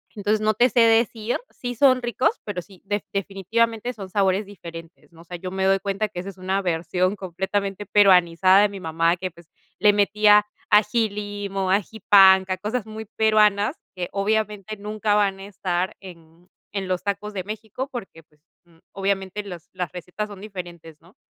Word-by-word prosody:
entonces 210 +1 0
no 215 0 +2
te 245 +3 +4
sé 235 - +3
decir, 225 0 +2
sí 245 -1 -6
son 255 0 +4
ricos, 255 - 0
pero 200 -4 -4
sí 185 +1 -18
def 205 +1 -1
definitivamente 225 +5 -1
son 195 -5 -9
sabores 195 0 +1
diferentes, 170 -4 -11
¿no? 165 0 -16
O - - -14
sea, 175 +1 -7
yo 185 +1 -6
me 190 0 -1
doy 195 0 +3
cuenta 200 +2 -2
que 175 - -7
esa 185 - -6
es 190 - -12
una 190 +2 -1
versión 180 +2 0
completamente 195 +2 -3
peruanizada 185 -1 +5
de 210 - +3
mi 200 - -8
mamá 165 0 +1
que, 185 0 -4
pues, 170 0 -19 0.3
le 210 -1 +6
metía 210 0 +4 0.2
ají 215 +1 +3
limo, 200 -2 -3
ají 205 +3 -1
panca, 190 -1 +7
cosas 215 +4 -3
muy 220 0 -7
peruanas 215 +2 +2 0.2
que 180 -1 -4
obviamente 210 0 -1
nunca 210 0 -1
van 200 -2 +1
a 195 - -8
estar 185 -2 -2
en 170 -1 -15 0.3
en 195 -2 -2
los 185 -1 -2
tacos 210 +1 -3
de 190 -2 -4
México, 220 +6 -6
porque, 190 -9 -8
pues, 150 -1 -33 0.2
mm, 165 -1 -25
obviamente 195 +1 -2
los 180 -5 -10
las 180 -2 -4
recetas 180 +4 -5
son 200 -2 -10
diferentes, 175 -6 -9
¿no? 175 +5 -22
195 Hz, 185 wpm, -23 LUFS, 185-210 Hz, 0.3 s, panca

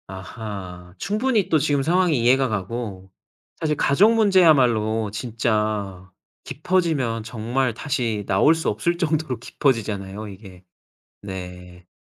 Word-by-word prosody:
아하. 95 -2 -8
충분히 215 0 0
또 160 - +4
지금 145 -2 +1
상황이 175 0 +2
이해가 130 +3 +3
가고 100 -2 -5 0.5
사실 155 -2 0
가족 200 +11 +4
문제야말로 130 - +3
진짜 105 -4 -2 0.3
깊어지면 150 -8 -1
정말 120 +3 -2
다시 115 -4 -2
나올 160 - +4
수 160 - -1
없을 170 +12 -1
정도로 155 -6 -1
깊어지잖아요 110 -6 -2
이게. 95 -2 -12 0.6
네. 90 -2 -9
115 Hz, 260 characters per minute, -22 LUFS, 100-150 Hz, 0.6 s, 또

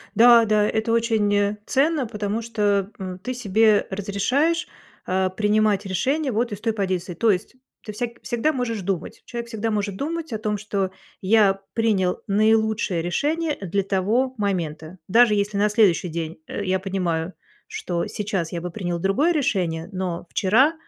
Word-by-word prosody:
Да-да, 225 -3 +6
это 220 +1 -1
очень, 225 -3 +2
э, 205 +1 +2
ценно, 285 -1 +1
потому 210 0 -3
что, 205 -3 0
м, 185 -1 -6
ты 255 +7 -4
себе 215 -2 +3
разрешаешь, 250 - 0 0.4
а, 185 0 +1
принимать 210 0 +1
решения 270 - 0
вот 235 +2 0
из 205 0 -6
той 225 -1 0
позиции. 185 -3 -2
То 220 +5 +3
есть 195 +6 -3 0.3
ты 210 - -6
всяк 235 +1 -5
всегда 240 +5 0
можешь 245 -7 -2
думать, 185 -2 -4
человек 235 -1 -6
всегда 225 -1 -3
может 205 -2 -1
думать 320 0 -4
о 220 - -1
том, 210 -1 -1
что: 200 -2 -2 0.3
я 195 -1 +4
принял 205 -6 +1
наилучшее 215 -3 +2
решение 300 - -1
для 195 +1 -1
того 210 +7 0
момента, 170 -4 -3
даже 230 +2 +5
если 205 0 -1
на 210 +1 +3
следующий 205 -5 +3
день, 165 0 -4
э, - - -4
я 190 0 +1
понимаю, 185 -3 -2 0.3
что 170 -1 -3
сейчас 195 -6 -3
я 170 -1 -4
бы 180 - -5
принял 175 -3 -3
другое 200 - +2
решение, 180 - 0
но 185 -3 -4
вчера 250 - +3
210 Hz, 160 wpm, -23 LUFS, 190-230 Hz, 0.4 s, Да-да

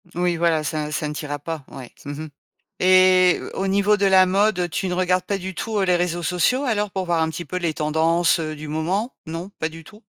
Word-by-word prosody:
Oui, 175 0 +1
voilà, 165 -2 +2
ça 150 0 -3
ça 150 0 -2
ne 150 - -4
t'ira 145 -1 -4
pas. 160 0 -6
Ouais, 130 -3 -10
mmh 145 - -5
mh. 155 - -8 0.5
Et 185 0 +5
au - - -4
au - - 0
niveau 200 +2 +3
de 200 - +1
la 190 -1 +6
mode, 190 -1 +1
tu 190 - -2
ne 180 - -2
regardes 185 0 +1
pas 200 0 -1
du 190 0 -6
tout, 220 +4 -3
heu, - - +2
les 180 - +3
réseaux 175 -1 -1
sociaux, 180 - +1
alors, 210 -6 0
pour 190 -1 -3
voir 170 -2 +1
un 160 - +1
petit 170 +2 -6
peu 180 - -4
les 170 -3 -1
tendances, 165 +3 +2
heu, 155 -1 -4
du 155 +1 -8
moment? 180 - -2
Non, 165 +4 -6
pas 160 - -1
du 165 0 -11
tout? 210 +5 -16
175 Hz, 250 wpm, -22 LUFS, 160-190 Hz, 0.5 s, la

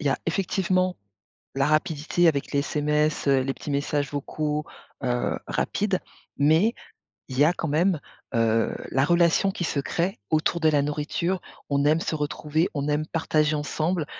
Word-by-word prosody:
il 150 - -4
y - - +5
a - - 0
effectivement 185 -1 +1 0.6
la 135 0 +2
rapidité 155 +2 +2
avec 140 -3 0
les 140 - +2
SMS, 150 +1 0
heu, 135 -1 +5
les 135 +1 -1
petits 145 - -7
messages 145 0 0
vocaux, 150 +1 -2 0.4
heu, 125 -1 0
rapides. 200 -3 0 0.4
Mais 160 +10 +4 0.6
il 130 - -5
y 145 - +6
a 155 - +5
quand 170 - -3
même, 165 +3 +2 0.4
heu, 115 -1 +2 0.2
la 135 +1 +3
relation 170 +3 +3
qui 185 - -4
se 145 - -1
crée 170 +6 -1
autour 160 +2 +1
de 160 - +5
la 145 -2 +3
nourriture. 155 +5 -1 0.3
On 140 0 +2
aime 155 +2 +4
se 160 - -2
retrouver, 150 +2 -1
on 145 0 -2
aime 150 +1 0
partager 155 -2 +1
ensemble, 155 +3 -1
150 Hz, 170 wpm, -25 LUFS, 145-170 Hz, 0.6 s, y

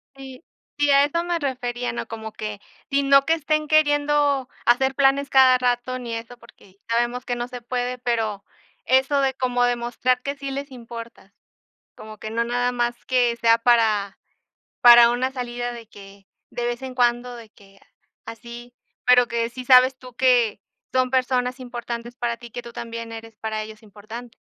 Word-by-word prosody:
Sí. 265 +1 -11 0.3
Sí, 290 0 +2
a 280 0 +6
eso 335 +4 -2
me 345 -1 -1
refería, 245 -4 -3
¿no?, - - -5
como 220 -1 -8
que 210 -1 -6 0.3
si 280 -1 +1
no 275 0 +5
que 325 - +2
estén 305 -1 -1
queriendo 290 -3 +2 0.2
hacer 265 +3 +3
planes 275 +1 +2
cada 260 -2 +6
rato 250 +1 -1
ni 235 -2 -5
eso 230 +2 -8
porque 195 -4 -20
sabemos 240 +2 0
que 245 - -3
no 240 0 -4
se 250 -1 -9
puede, 245 +1 -3
pero 225 -5 -2 0.4
eso 265 +3 +3
de 265 -1 0
como 250 -2 0
demostrar 245 +1 0
que 280 +1 -3
sí 275 -1 -6
les 275 +1 -5
importa, 230 -4 -11 0.6
como 215 0 -11
que 215 - -7
no 230 +1 0
nada 245 +1 0
más 240 -1 -2
que 245 -2 +2
sea 230 0 +3
para 220 -4 +2 0.6
para 240 -1 +9
una 255 +2 -1
salida 245 -1 -4
de 230 -2 -11
que 195 -2 -15 0.2
de 240 - -4
vez 240 +1 -3
en 260 -1 -6
cuando, 245 0 +1
de 230 -2 -11
que 195 -1 -21 0.4
así, 235 +2 -10 0.3
pero 250 -1 +5
que 235 -1 -1
sí 255 +1 -8
sabes 255 +1 +6
tú 250 -1 -13
que 245 -5 +2 0.3
son 255 -1 +1
personas 255 0 0
importantes 240 -1 -7
para 240 -1 -2
ti, 240 0 -12
que 245 - -6
tú 235 - -11
también 230 0 -7
eres 225 -1 -10
para 220 0 -4
ellos 215 0 -11
importante. 220 +3 -11
245 Hz, 180 wpm, -23 LUFS, 230-260 Hz, 0.6 s, para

